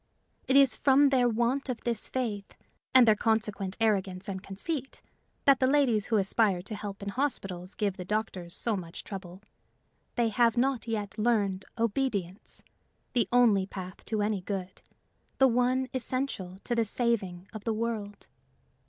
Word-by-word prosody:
It 265 - +2
is 275 -2 +6
from 280 0 +5
their 250 -3 +3
want 240 +5 0
of 245 - -2
this 235 -3 -2
faith, 215 -6 -3 0.4
and 255 -2 +7
their 220 - +8
consequent 210 -3 -1
arrogance 195 -4 0
and 190 -2 -4
conceit, 265 - -5 0.5
that 275 -2 +6
the 260 - +3
ladies 260 -7 +3
who 225 - +1
aspire 195 -2 +2
to 210 - -6
help 205 -1 -6
in 200 - -3
hospitals 195 -8 -3
give 200 -3 -1
the 180 - -5
doctors 190 -3 -3
so 230 -3 -1
much 170 -3 -7
trouble: 190 -1 -8 0.7
they 235 -2 +2
have 235 +2 +3
not 250 -2 +1
yet 215 -2 -3
learned 205 -4 +1
obedience, 220 -5 -1 0.5
the 235 -6 +2
only 225 -6 +4
path 185 -1 -8
to 215 -2 -1
any 205 -2 0
good, 185 -1 -5 0.6
the 265 - +6
one 250 +2 +2
essential 255 -8 -2
to 240 - -2
the 230 -1 +2
saving 200 -5 -1
of 215 -2 -7
the 225 - 0
world. 215 -2 -3
220 Hz, 160 wpm, -29 LUFS, 195-245 Hz, 0.7 s, their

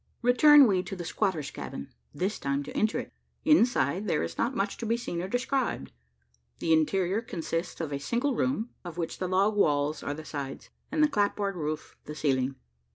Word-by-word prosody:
Return 280 +4 +8
we 190 -5 +3
to 195 - -6
the 175 -2 -6
squatter's 165 -7 -1
cabin 70 - -7 0.2
this 195 +4 -2
time 140 +1 -1
to - - -9
enter 215 +1 +1
it. - - -6 0.3
Inside, 215 - +3
there 80 - +1
is 85 - -4
not 245 +3 0
much 195 +1 -1
to 230 - -4
be 230 +2 +2
seen 175 -7 -4
or 185 - -3
described. 245 - -1 0.7
The 165 - +1
interior 185 +6 +2
consists 175 -5 -4
of 155 -4 -3
a 140 - -2
single 240 - 0
room 245 -2 0
of 175 -2 -8
which 170 -2 -3
the 185 - -1
log 195 +3 +2
walls 150 -5 +2
are 145 - -3
the 155 +1 -9
sides, 140 -3 -6 0.2
and 310 0 +3
the - - +6
clapboard 205 -5 0
roof 155 -2 -4
the 150 - -7
ceiling. 135 -3 0
185 Hz, 195 wpm, -28 LUFS, 150-230 Hz, 0.7 s, Return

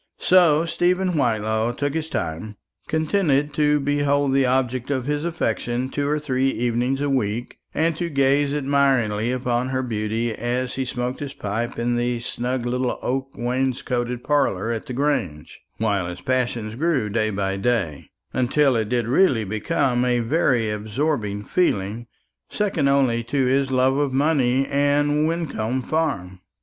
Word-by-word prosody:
So 170 -4 +4
Stephen 180 +2 +1
Whitelaw 110 -3 0
took 145 +3 -2
his 160 0 -3
time, 85 - -4 0.3
contented 155 -3 +1
to 150 -1 +2
behold 145 -1 +1
the 135 -1 +3
object 130 0 0
of 130 -3 -1
his 150 +1 -1
affection 125 -6 -2
two 145 +1 -2
or 150 - +1
three 135 -3 0
evenings 125 +2 0
a 145 - 0
week, 120 -3 -2
and 165 +1 +1
to 170 0 -2
gaze 140 0 +2
admiringly 135 -6 +1
upon 125 0 -1
her 130 0 -1
beauty 110 0 -2
as 125 +3 -2
he 130 - -2
smoked 125 +1 -3
his 140 -1 -6
pipe 115 +4 -3
in 120 +1 0
the 120 0 0
snug 125 +1 -3
little 125 +1 -1
oak 135 +1 -2
wainscoted 125 -1 -1
parlour 115 -8 +1
at 115 -2 -4
the 130 - -5
Grange, 120 - -2 0.2
while 100 -5 0
his 90 +1 -7
passion 120 -3 -1
grew 155 -9 +1
day 110 +1 0
by 95 -1 -1
day, 100 -8 -1 0.2
until 130 +2 +2
it 110 -2 -1
did 120 -2 0
really 130 -4 +3
become 120 - 0
a 125 -1 +2
very 120 -4 +1
absorbing 105 -1 -2
feeling, 115 - 0 0.4
second 190 -9 0
only 130 -4 +2
to 130 +3 0
his 135 +1 +2
love 130 +1 +2
of 145 -2 +1
money 135 -2 +2
and 145 +2 +2
Wyncomb 130 -7 -2
Farm. 135 - -2
130 Hz, 155 wpm, -23 LUFS, 115-145 Hz, 0.4 s, So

